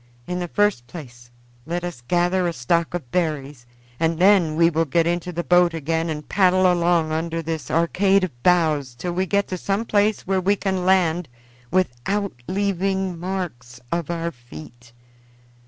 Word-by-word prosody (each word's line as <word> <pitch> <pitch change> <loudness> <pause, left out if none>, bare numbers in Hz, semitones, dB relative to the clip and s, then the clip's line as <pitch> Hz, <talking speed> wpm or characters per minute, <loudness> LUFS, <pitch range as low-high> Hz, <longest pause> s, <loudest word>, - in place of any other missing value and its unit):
In 180 0 -3
the 175 - -3
first 205 - +1
place 120 -7 -11 0.4
let 175 +1 -3
us 175 -9 -6
gather 175 +6 +1
a 170 - -2
stock 165 +6 0
of 135 -9 -6
berries, 150 -7 -2 0.3
and 165 0 +1
then 180 -4 +4
we 165 +1 +5
will 165 +1 +1
get 165 +3 +1
into 175 +1 -1
the 175 0 -3
boat 175 +2 +4
again 165 +2 -1
and 150 -1 -5
paddle 185 -2 +3
along 170 -2 +1
under 165 +1 -2
this 160 -5 -4
arcade 190 +4 +2
of 125 -10 -5
boughs 155 -7 +2
till 175 +9 -4
we 185 +2 -1
get 200 +2 +1
to 185 - -4
some 200 +5 -1
place 210 -1 +2
where 190 0 0
we 200 +3 +2
can 190 -2 -2
land 180 -4 +2 0.4
without 185 +4 -1
leaving 190 -2 -1
marks 165 -10 -5
of 170 -2 -2
our 170 0 -2
feet. 120 - -13
170 Hz, 170 wpm, -22 LUFS, 155-185 Hz, 0.4 s, we